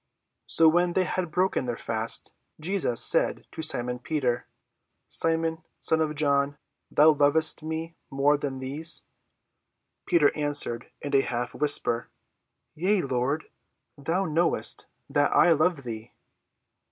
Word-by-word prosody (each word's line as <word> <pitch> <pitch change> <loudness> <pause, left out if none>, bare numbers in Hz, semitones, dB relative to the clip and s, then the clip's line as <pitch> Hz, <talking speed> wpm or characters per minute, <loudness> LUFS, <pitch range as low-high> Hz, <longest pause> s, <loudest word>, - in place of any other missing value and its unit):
So 165 - +5
when 175 +2 +2
they 185 - +2
had 180 -1 -3
broken 180 -5 0
their 120 - -3
fast, 115 0 0 0.3
Jesus 165 -7 +1
said - - +3
to - - -7
Simon 125 -5 0
Peter, 125 -4 -2 0.6
"Simon, 165 0 0 0.2
son 160 0 +2
of 155 -1 -1
John, 140 -1 0 0.4
lovest 150 +1 +4
thou 155 - -9
me 160 +1 -5
more 140 +2 +2
than 140 -2 -4
these?" 145 +5 0 1.0
Peter 160 -5 +3
answered 145 -5 +1
in 145 -1 -3
a 135 - +5
half 120 -2 -4
whisper, 140 -5 0 0.6
"Yea, 185 +5 0
Lord; 135 +4 -1 0.5
thou 165 +7 -2
knowest 165 +1 -1 0.2
that 145 0 +1
I 175 - +5
love 160 -1 +1
thee." 115 -1 -8
150 Hz, 130 wpm, -26 LUFS, 135-165 Hz, 1.0 s, So